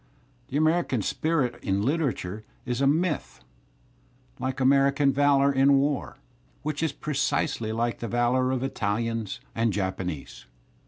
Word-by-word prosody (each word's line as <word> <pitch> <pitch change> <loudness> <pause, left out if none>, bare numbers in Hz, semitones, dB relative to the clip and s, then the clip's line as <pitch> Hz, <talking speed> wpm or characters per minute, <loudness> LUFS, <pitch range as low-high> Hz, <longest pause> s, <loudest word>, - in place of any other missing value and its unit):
The 140 - -2
American 155 - +2
spirit 150 -4 0
in 100 0 0
liter 145 +2 +1
atur 95 +1 -6
e - - -17 0.2
is 125 0 -2
a 135 - +4
myth, 150 - 0 1.0
like 130 0 -3
American 140 +1 +4
valour 140 0 +4
in 135 +1 +5
war, 140 0 -1 0.5
which 150 0 -2
is 160 -3 +1
precisely 135 -6 -1
like 115 +1 -1
the 115 - -4
valour 120 +3 +1
of 130 -1 -1
Italians 115 -3 -2
and 115 0 +1
Japanese. 95 -10 -4
130 Hz, 140 wpm, -26 LUFS, 115-140 Hz, 1.0 s, in